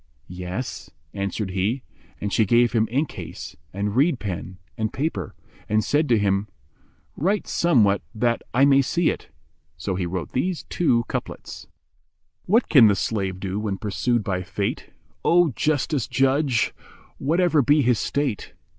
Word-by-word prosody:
"Yes,'' 90 +7 -6 0.2
answered 100 0 -3
he, 105 +8 -1 0.4
and 100 0 -3
she 110 - +4
gave 120 +3 +4
him 110 -2 +2
ink 140 +6 0
case - - -8 0.2
and 100 +2 -2
reed 140 0 +3
pen 95 -2 -5 0.2
and 110 -2 -2
paper 135 - -3 0.3
and 110 0 +2
said 150 +1 +1
to 115 - +5
him, 100 0 +1 0.7
"Write 195 +6 0
somewhat 110 - +3
that 120 +1 +1
I 135 +4 +4
may 140 -1 +5
see 165 +5 +1
it." - - -8 0.5
So 95 +6 -3
he 90 -1 -2
wrote 90 0 -4
these 175 +6 -1
two 120 -9 +2
couplets, - - -6 0.8
"What 225 +6 +3
can 125 -8 +7
the 100 - +3
slave 95 -3 -2
do 95 +1 -3
when 105 -2 -2
pursued 110 +4 0
by 90 -2 -1
Fate, 100 +2 -3 0.2
* - - -40
O 175 -2 +4
justest 145 +1 0
Judge! 135 -2 +2 0.5
whatever 165 +1 +3
be 145 +3 +4
his 120 -3 +2
state? 140 -7 -2
115 Hz, 155 wpm, -23 LUFS, 100-145 Hz, 0.8 s, can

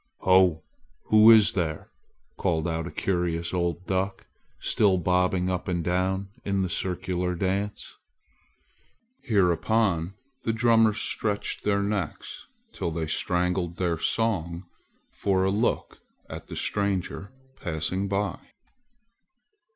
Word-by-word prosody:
"Ho! 95 -4 +4 0.5
who 110 +1 +7
is 110 -2 +7
there?" 80 -4 -3 0.4
called 85 -3 0
out 80 -1 -2
a - - -7
curious 85 -2 -1
old 85 0 -1
duck, 95 +1 -2 0.3
still 100 -4 +2
bobbing 90 +1 +1
up 90 -1 -2
and 85 -2 -1
down 95 +2 -1
in 100 -1 0
the 95 - -2
circular 90 -1 -2
dance. 100 +3 -3 1.2
Hereupon 100 - +1 0.3
the 115 - -1
drummers 115 -1 +3
stretched 105 -2 -1
their 100 -1 +1
necks 100 -2 -4 0.3
till - - -3
they 80 0 -3
strangled 90 +2 -1
their 85 -3 -1
song 90 -5 -1 0.5
for 95 -2 0
a 95 - +2
look 110 +4 -1 0.3
at - - -9
the - - -7
stranger 100 0 -2 0.3
passing 90 +3 -2
by. 100 -2 -1
95 Hz, 115 wpm, -26 LUFS, 85-100 Hz, 1.2 s, who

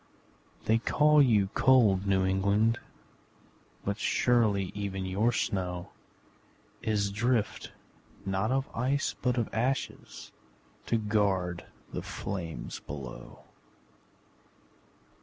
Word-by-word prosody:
They 110 +1 +3
call 150 +4 +4
you 105 -8 +4
cold 105 -7 +4
New 95 -1 +3
England 100 +5 +2 1.1
But 100 +1 -2
surely 105 -5 +2
even 100 -2 -3
your 100 +6 +1
snow 90 -5 -2 0.9
Is 105 -3 0
drift 115 +1 0 0.5
not 95 +4 0
of 135 +1 0
ice 130 +4 0
but 125 0 +1
of 115 - +1
ashes, 130 +4 -3 0.6
To 115 - +2
guard 100 -5 0 0.3
the - - -3
flames 85 -4 -5
below! 70 -3 -9
105 Hz, 95 wpm, -29 LUFS, 95-120 Hz, 1.1 s, call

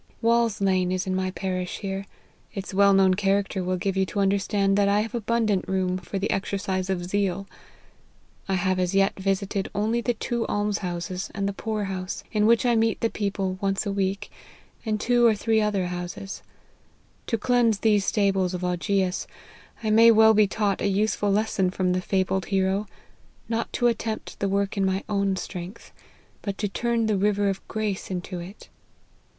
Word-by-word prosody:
Wall's 230 -2 +2
Lane 185 -2 +2
is 185 0 -1
in 190 - -1
my 185 0 0
parish 185 -1 -3
here. 195 -1 -4 0.5
Its 195 0 -5
well 200 +1 +5
known 195 -1 +5
character 195 0 0
will 185 0 -1
give 195 +1 -1
you 190 - +2
to 205 - -3
understand 195 0 +2
that 200 0 +3
I 205 +1 +3
have 225 +3 -5
abundant 225 -3 0
room 185 -1 0
for 185 +2 -5
the 195 +2 -1
exercise 195 -1 -2
of 180 -2 -1
zeal. 195 0 -1 1.0
1 190 -1 +1
have 185 +1 0
as 180 +1 0
yet 195 0 +2
visited 195 0 -1
only 220 +4 +1
the 240 0 0
two 235 +1 -2
alms 205 0 0
houses 180 +1 -4
and 200 0 -1
the 200 - -2
poor 215 +1 -3
house, 185 -1 -4
in 210 -1 +2
which 230 +1 +4
I 240 -1 +3
meet 225 0 +2
the 230 - +1
people 195 -2 -2
once 195 +1 0
a 200 - -1
week, 195 0 -2 0.5
and 215 -2 -1
two 240 +1 +4
or 220 - +4
three 220 +1 +1
other 205 -3 0
houses. 180 +2 -5 0.9
To 230 - 0
cleanse 235 -2 +2
these 210 -3 +3
stables 195 -3 +1
of 180 - -5
Augeas, 180 +1 0 0.6
I 215 - +1
may 225 +2 +7
well 220 0 +7
be 210 -1 +4
taught 205 -1 -1
a - - +1
useful 205 +1 +1
lesson 200 -2 +1
from 180 0 0
the 185 - 0
fabled 190 0 0
hero 195 +1 0 0.6
not 230 0 -2
to 240 - 0
attempt 225 -2 -1
the 200 - 0
work 200 +1 0
in 195 - +2
my 190 0 0
own 200 -2 +1
strength, 185 +2 -7 0.5
but 200 -1 -4
to 205 - -1
turn 235 +3 0
the 215 -2 +1
river 205 0 +2
of 195 0 -4
grace 215 -3 -3
into 180 0 -4
it. 180 +4 -10
200 Hz, 185 wpm, -25 LUFS, 190-215 Hz, 1.0 s, may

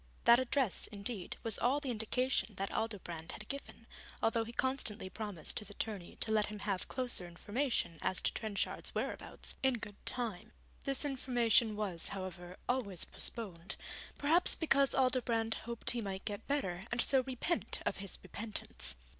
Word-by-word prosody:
That 235 +1 +8
address, 260 -4 +2
indeed, 205 -1 -4
was 225 -3 +2
all 260 +4 +3
the 275 -3 -2
indication 235 0 +1
that 195 +1 -2
Aldobrand 175 -7 -3
had 210 - -8
given, 280 0 -6 0.5
though 230 0 +1
he 225 - -7
constantly 235 -7 0
promised 205 -6 -3
his 210 - -4
attorney 205 -3 -4
to 220 - +1
let 215 -1 +4
him 210 - -5
have 195 -3 -1
closer 245 -8 0
information 205 - -1
as 185 - +2
to - - +1
Trenchard's 215 -3 -2
whereabouts, - - -3
in 265 -1 +4
good 210 -3 -8
time. 230 -8 -2 0.3
This 275 +1 +3
information 240 -5 +3
was, 195 -6 0
however, 185 -2 -5
always 230 -8 0
postponed, 195 -5 -3 0.4
perhaps 325 +5 +5
because 280 -4 +3
Aldobrand 240 -3 +3 0.2
hoped 235 -1 +2
he 240 - -1
might 195 -2 -4
get 205 -2 -4
better 190 -12 0
and 235 - 0
so 265 +2 +5
repent 265 +7 0
of - - 0
his 195 -2 -2
repentance. 215 - 0
225 Hz, 155 wpm, -35 LUFS, 195-255 Hz, 0.5 s, That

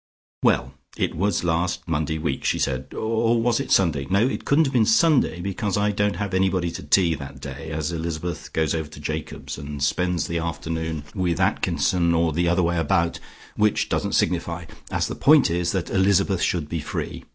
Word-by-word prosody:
"Well, - - +2 0.2
it - - 0
was 95 +1 0
last 85 +1 -1
Monday 80 -1 -1
week" 75 -4 -2
she - - +1
said 65 -2 -2
"or 115 +1 +1
was 115 +1 +2
it 140 - -4
Sunday? 80 -8 +2
No 100 +6 +3
it - - -4
couldn't 155 +3 +4
have 135 - -2
been 120 -3 +4
Sunday 125 - +3
because 100 +2 -2
I 105 0 +2
don't 105 0 0
have 100 -1 -3
anybody 95 -2 +1
to - - -7
tea 90 -4 +3
that 70 -3 -8
day, 70 +2 -7
as 80 0 -2
Elizabeth 85 0 -4
goes 80 0 0
over 80 -2 -3
to 75 - -12
Jacob's 75 +2 -5
and 70 0 -5
spends 90 +4 0
the 85 0 -2
afternoon 80 -1 -3
with 90 -4 -1
Atkinson, 85 -3 +1
or 85 -1 +2
the 85 +3 +1
other 90 +1 +2
way 85 0 +1
about, 85 +1 +1 0.4
which 105 -1 +1
doesn't - - -1
signify, - - 0 0.2
as - - 0
the - - -4
point 145 - +5
is 85 0 0
that 95 -3 -2
Elizabeth 95 -1 +2
should 85 -4 0
be 85 +1 -3
free. 75 - -5
85 Hz, 195 wpm, -23 LUFS, 80-100 Hz, 0.4 s, point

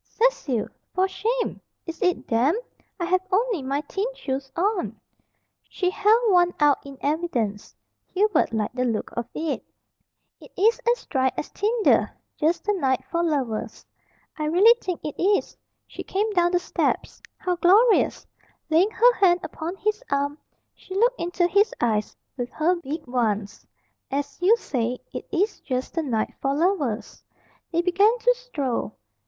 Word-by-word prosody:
"Cecil! 315 - 0 0.3
For 375 +1 +3
shame! 465 +5 -2 0.2
Is 330 +2 -7
it 360 -3 +1
damp? 250 - +2 0.4
I 345 - -1
have 365 +1 +2
only 430 - +1
my 275 +2 -1
thin 390 +8 -3
shoes 270 - -4
on." 385 +2 -1 0.7
She 365 -1 -1
held 435 +3 +3
one 355 -1 +4
out 295 -2 +4
in 275 -1 -10
evidence. 270 -10 -2 0.3
Hubert 385 - +2
liked 220 +1 -2
the 250 - 0
look 230 -4 -2
of 235 -1 -3
it. 315 -2 -2 0.8
"It - - -15
is 445 +5 +3
as 485 - -3
dry 260 -2 +1
as - - -4
tinder; 435 +2 +2 0.3
just 320 +3 0
the 415 - +1
night 265 -9 0
for 340 - +1
lovers." 265 -9 -2 0.5
"I 305 - -1
really 370 +9 +6
think 365 -3 -4
it 300 - -5
is." 400 +3 +1 0.3
She - - -9
came 420 +3 -1
down 350 -1 +2
the - - +5
steps. 350 - -2 0.2
"How 360 -1 -1
glorious!" 415 +7 +4 0.5
Laying 345 +6 +4
her 485 +3 +5
hand 360 -5 +3
upon 335 +3 -5
his 425 +2 -2
arm, 285 +1 -1 0.3
she 375 - -10
looked 480 +5 +2
into 350 +1 0
his 405 +5 +2
eyes 215 -3 0 0.2
with 245 -1 -3
her 335 +4 +2
big 310 -1 -6
ones. 220 -4 -2 0.4
"As 280 +1 -3
you 415 +6 +5
say, 245 - -2 0.2
it - - -6
is 400 +4 0
just 255 -2 -3
the 330 - 0
night 235 -8 -1
for 275 0 0
lovers." 295 - -1 0.5
They 340 0 +1
began 400 +6 +3
to - - +3
stroll. 290 - -3
345 Hz, 160 wpm, -24 LUFS, 270-400 Hz, 0.8 s, really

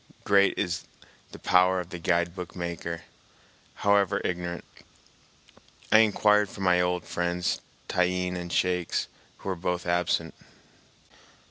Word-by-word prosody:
Great 100 -1 +4
is 90 -3 -2 0.5
the - - -9
power 90 0 +3
of 90 -1 -6
the 90 - -6
guidebook 85 +1 -1
maker, 85 -1 -4 0.8
however 100 -1 +3
ignorant. 85 -1 -3 1.3
I 110 - +8
inquired 105 -1 +4
for 100 - -9
my 90 -1 +4
old 90 -1 0
friends 85 0 -1 0.3
Tyeen 90 0 0
and 90 -1 -5
Shakes, 90 -2 0 0.3
who - - -6
were 95 - -1
both 90 0 -2
absent. 85 -1 0
90 Hz, 120 wpm, -27 LUFS, 85-95 Hz, 1.3 s, I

